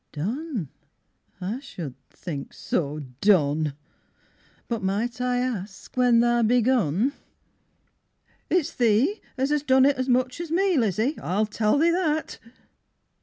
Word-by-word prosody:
Done, 220 - -3 0.7
I 200 +7 -3
should 175 - -7 0.2
think 145 -6 -7
so 150 -2 -2 0.2
Done! 155 -7 +3 0.9
But 230 -2 -2
might 220 +6 -2
I 250 0 +1
ask 215 -6 -4
when 245 -2 +4
tha 240 0 +3
begun? 235 - +2 1.4
It's 335 -3 +1
thee 245 - +2 0.2
as 265 +2 0
'as 295 -1 +2
done 265 -2 +4
it 280 -1 +3
as 260 0 -2
much 255 +4 +1
as 340 - -6
me, 370 +2 +2
Lizzie, 230 - +1
I 195 +5 0
tell 215 +3 +1
thee 330 +3 +4
that. 315 -3 -1
240 Hz, 125 wpm, -25 LUFS, 195-275 Hz, 1.4 s, when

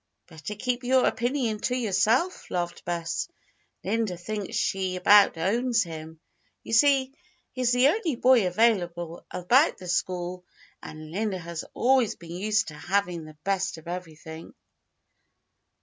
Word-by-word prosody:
"Better 160 +5 -8
keep 245 +3 -2
your 255 +1 +3
opinion 240 -2 0
to 250 - -1
yourself," 235 - +1
laughed 175 -1 -3
Bess. 170 -1 -2 0.6
"Linda 220 -6 -1
thinks 205 +2 -5
she 190 -1 -1
about 200 0 +6
owns 230 +8 +1
him. 160 -1 -9 0.4
You - - -6
see, 270 +2 +4 0.4
he's 250 -2 0
the 250 +2 +5
only 340 - 0
boy 250 -4 +4
available 175 -5 0
about 245 - +3
the 185 - -10
school 180 0 -2 0.4
and 155 0 -10
Linda 205 +1 -2
has 170 -2 -6
always 255 -2 +3
been 170 -1 -12
used 215 +3 0
to - - -10
having 175 +1 -2
the 155 -1 -13
best 195 -1 -1
of 160 +1 -14
everything." 160 -2 -8
195 Hz, 135 wpm, -26 LUFS, 175-240 Hz, 0.6 s, about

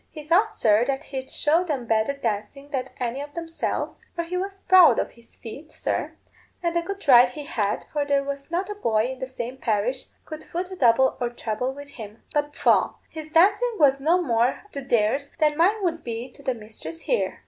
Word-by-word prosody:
He 305 - -9
thought, 370 +8 +3
sir, 215 +1 +3
that 275 +1 -1
he'd 265 -2 -6
show 320 +4 +2
them 290 -8 -3
better 225 +4 +1
dancing 240 +2 -4
than 265 -2 -2
any 250 +2 -2
of 290 0 -9
themselves, 330 -1 -3
for 340 - -1
he 340 +2 -5
was 390 +1 -4
proud 370 -2 +7
of - - -1
his 235 -1 -18
feet, 275 +7 -10
sir, - - -2 0.5
and 340 0 0
a 340 - +3
good 395 +1 -7
right 250 -2 +8
he 290 +4 -8
had, 210 -6 -1
for 295 -1 +1
there 280 -1 +1
was 280 +1 -5
not 365 +4 -2
a - - -2
boy 230 - 0
in 260 - -8
the 260 - -4
same 255 0 -6
parish 240 +2 -1 0.2
could 310 0 -8
foot 360 +2 -5
a - - -5
double 260 -3 +4
or 240 - +1
treble 240 +1 -3
with 285 +1 -10
him. 220 -5 -10
But 295 -1 0
pwah! - - +3 0.2
his 315 -1 -8
dancing 410 +9 +4
was 275 -3 +4
no 325 +6 +3
more 240 -6 +1
to 280 - -5
theirs 260 +2 +1
than 305 -2 +3
mine 390 +6 +3
would 330 -3 -1
be 235 +2 -5
to 280 - -16
the 265 -3 -1
mistress' 225 +9 -9
there. - - 0
280 Hz, 215 wpm, -24 LUFS, 240-330 Hz, 0.5 s, right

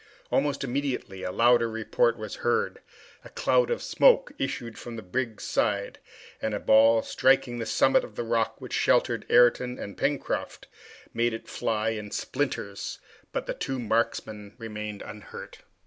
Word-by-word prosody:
Almost 140 0 +1
immediately 130 -7 -3
a 90 - -3
louder 120 +2 +4
report 475 - +1
was - - -6
heard, 470 -1 0 0.4
a - - -11
cloud - - +2
of 475 - -1
smoke - - +4
issued 115 -1 -3
from 120 -1 -8
the 110 - -7
brig's 110 +2 -3
side, - - -1 0.4
and 110 -1 -1
a - - -2
ball, 110 +1 +5
striking 130 -2 +2
the 115 - -3
summit 135 - +3
of 105 - -10
the 120 - -2
rock 115 -1 0
which - - -8
sheltered - - +2
Ayrton 125 +1 +4
and 100 - -7
Pencroft, 140 -1 -2 0.5
made 115 0 +1
it 115 - -10
fly 110 0 -1
in 105 -2 -4
splinters, 120 -6 -3 0.3
but - - -3
the - - -2
two 135 - -3
marksmen 110 -3 -2
remained 105 -3 -6
unhurt. 105 0 -10
115 Hz, 155 wpm, -27 LUFS, 110-130 Hz, 0.5 s, ball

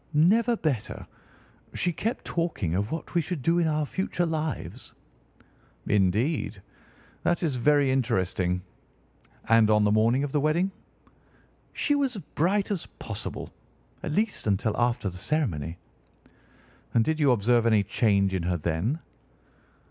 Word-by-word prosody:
"Never 225 +9 +4
better. 140 - -2 0.7
She 175 - 0
kept 225 +9 -3
talking 165 - -1
of 100 +4 -1
what 160 - -5
we 170 - +3
should 160 -3 -5
do 170 +4 +3
in 170 - +2
our 155 -1 0
future 180 +2 -1
lives." 155 -7 -4 0.9
"Indeed! 105 - +1 0.6
That 175 +1 0
is 150 -6 0
very 140 +2 +3
interesting. 95 -8 0 0.8
And 115 -1 +5
on 105 -1 +4
the 105 - +3
morning 115 +5 +3
of 145 - -3
the 145 - +1
wedding?" 170 +6 +1 1.0
"She 290 - +1
was 275 -4 +1
as 200 - -6
bright 195 +6 +1
as 190 -5 -3
possible—at 110 +5 -8
least 210 - 0
until 105 +1 +1
after 120 -3 0
the 90 -1 -5
ceremony." 90 - -1 1.2
"And 115 -1 +4
did 160 0 0
you 145 -3 +4
observe 120 +1 +3
any 110 -3 +4
change 100 -1 +2
in 95 - 0
her 90 +1 0
then?" 85 - -1
130 Hz, 140 wpm, -27 LUFS, 105-165 Hz, 1.2 s, And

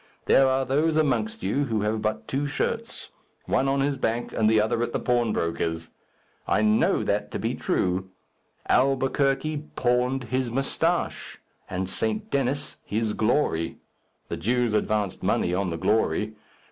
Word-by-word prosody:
There 135 - +5
are 130 0 +1
those 150 +4 +1
amongst 215 +9 0
you 145 +1 +1
who 110 -4 -1
have 105 +1 -1
but 110 0 -2
two 140 +2 -1
shirts 140 - -3 0.4
one 135 - +1
on 135 0 +1
his 140 0 0
back, 115 0 -2
and 110 -1 +3
the 110 -1 +4
other 110 +2 +1
at 120 0 -2
the - - 0
pawnbroker's. 85 -9 0 0.6
I 110 - +2
know 105 0 +3
that - - -1
to - - -4
be - - -1
true. 95 +1 -1 0.6
Albuquerque 135 +3 +1
pawned 125 +2 +1
his 130 +1 -1
moustache, 150 +7 -1 0.3
and 95 0 -2
St. 215 - -2
Denis 140 +1 -1
his 110 0 -1
glory. 110 - 0 0.5
The - - -4
Jews 120 +5 +1
advanced 105 -2 0
money 90 - +1
on 95 0 0
the 85 - -3
glory. 105 +2 +1
120 Hz, 150 wpm, -26 LUFS, 105-135 Hz, 0.6 s, There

